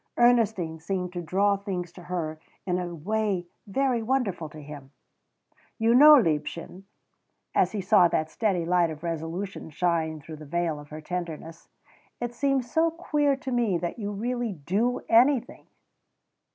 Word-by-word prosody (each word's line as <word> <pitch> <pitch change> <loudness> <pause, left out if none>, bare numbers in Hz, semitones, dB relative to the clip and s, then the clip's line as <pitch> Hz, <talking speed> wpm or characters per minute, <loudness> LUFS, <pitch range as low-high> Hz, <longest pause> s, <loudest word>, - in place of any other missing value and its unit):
Ernestine 220 -9 +3
seemed 180 +1 -3
to 175 - -3
draw 195 +5 +2
things 185 -4 -4
to 180 - -13
her 165 -3 -4 0.3
in 180 -1 0
a 175 -1 -4
way 200 +2 -1 0.2
very 250 +3 +1
wonderful 220 -10 -1
to 155 - -11
him. 145 -2 -10 0.9
"You 225 +1 +3
know, 300 +4 +9
liebchen," 170 - -1 0.7
as - - +2
he 205 - -2
saw 180 -1 +5
that 155 -1 -1
steady 190 -7 0
light 175 -1 +3
of 155 0 -8
resolution 170 +3 -4
shine 160 -1 0
through 155 +2 -10
the 155 - -10
veil 165 -1 -1
of 145 0 -13
her 155 +1 -8
tenderness 165 -1 -6 0.5
"it 240 0 -3
seems 270 -2 0
so 325 +1 +3
queer 300 -4 0
to 270 -1 -6
me 235 -7 +1
that 175 +6 -4
you 205 -1 -3
really 240 +2 -2
do 195 +10 -1
anything." 245 +2 +3
180 Hz, 155 wpm, -26 LUFS, 165-235 Hz, 0.9 s, know